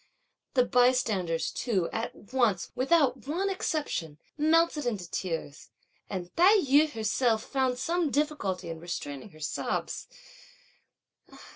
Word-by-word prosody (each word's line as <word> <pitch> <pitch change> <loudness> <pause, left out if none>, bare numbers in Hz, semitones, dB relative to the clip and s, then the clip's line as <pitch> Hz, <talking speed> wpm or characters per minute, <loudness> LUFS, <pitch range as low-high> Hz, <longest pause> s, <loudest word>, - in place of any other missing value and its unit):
The 250 -1 +5
bystanders 230 -10 +2
too, 195 -9 0
at 225 0 -5
once, 230 -9 +1
without 265 0 +2
one 375 +6 0
exception, 300 - -2 0.2
melted 315 -2 +2
into 200 -7 -2
tears; 165 -5 -4 0.4
and 180 -2 -5
Tai 370 +5 +6
yü 295 -2 +4
herself 225 -1 +1
found 260 -2 0
some 335 +4 0
difficulty 205 - -1
in 165 - -7
restraining 160 -2 -6
her 155 - -17
sobs. 150 - -3
245 Hz, 115 wpm, -29 LUFS, 185-300 Hz, 0.4 s, Tai